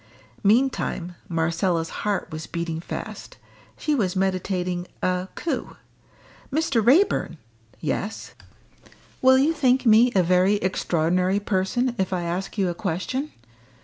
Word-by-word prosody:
Meantime 210 -5 +1 0.2
Marcella's 165 0 0
heart 205 -2 -1
was 155 0 -6
beating 170 -1 -3
fast. 165 - -7 0.4
She 305 - 0
was 195 -10 0
meditating 185 -1 -1 0.2
a 180 0 0
coup. 335 - -3 0.8
"Mr. 275 -6 +1
Raeburn!" 260 - +3 0.4
"Yes!" 205 - -3 0.9
"Will 260 0 +6
you 290 +5 +3
think 260 -4 +2
me 230 +2 +6
a 185 - +5
very 185 +3 +3
extraordinary 180 0 +1
person 205 +5 0
if 190 0 0
I 180 -1 -1
ask 180 +5 -4
you 195 -2 +2
a - - -2
question? 190 - -3
190 Hz, 120 wpm, -24 LUFS, 175-245 Hz, 0.9 s, Will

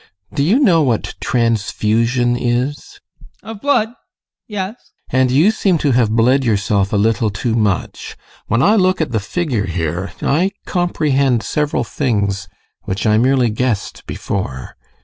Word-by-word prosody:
Do - - -1
you 180 - +3
know 190 - +4
what 125 -7 0
transfusion 115 +1 +1
is? 130 - -2 0.4
ADOLPH. 220 - -8
Of - - -22
blood? 250 -6 +2 0.6
Yes. 200 -1 -4 0.4
GUSTAV. 130 - +2
And 130 - +3
you 150 +11 +4
seem 195 -5 +1
to 145 -2 +1
have 120 -3 +3
bled 125 +4 +3
yourself 100 -3 +1
a - - 0
little 110 +2 +1
too 110 +3 -2
much. 105 -5 -2 0.3
When 115 +4 +1
I 215 +2 +4
look 185 -1 +2
at 160 -6 -1
the 110 - 0
figure 120 - -2
here 85 +2 -3
I 180 +7 +1
comprehend 140 - +1
several 150 -1 -1
things 100 -7 -1 0.4
which 95 +4 -3
I 110 0 +4
merely 125 -1 +2
guessed 110 -2 -2
before. 65 -10 -4
125 Hz, 150 wpm, -17 LUFS, 105-155 Hz, 0.6 s, know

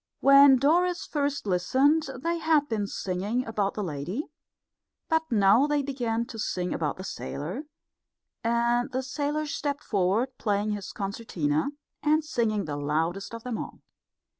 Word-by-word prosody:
When 275 0 +8
Doris 345 +6 +2
first 285 -4 -1
listened 265 - +2
they 335 0 0
had 315 -3 +3
been 215 -4 -1
singing 200 +7 -2
about 210 -3 -1
the 210 - -2
lady, 175 - -3 0.9
but 320 0 +3
now 215 +5 +5
they 295 -1 +1
began 240 -4 -1
to 225 - -9
sing 180 -3 -2
about 150 -3 -2
the 185 - -7
sailor, 190 - -5 0.8
and 235 +2 +1
the 260 +1 -2
sailor 295 +3 -2
stepped 290 0 -3
forward, 210 +6 0
playing 210 0 0
his 205 -2 -4
concertina, 190 - -2 0.3
and 310 +1 +2
singing 220 - 0
the 145 -2 -4
loudest 165 +9 -1
of 230 - -9
them 245 -3 -3
all. - - -7
230 Hz, 145 wpm, -27 LUFS, 195-285 Hz, 0.9 s, When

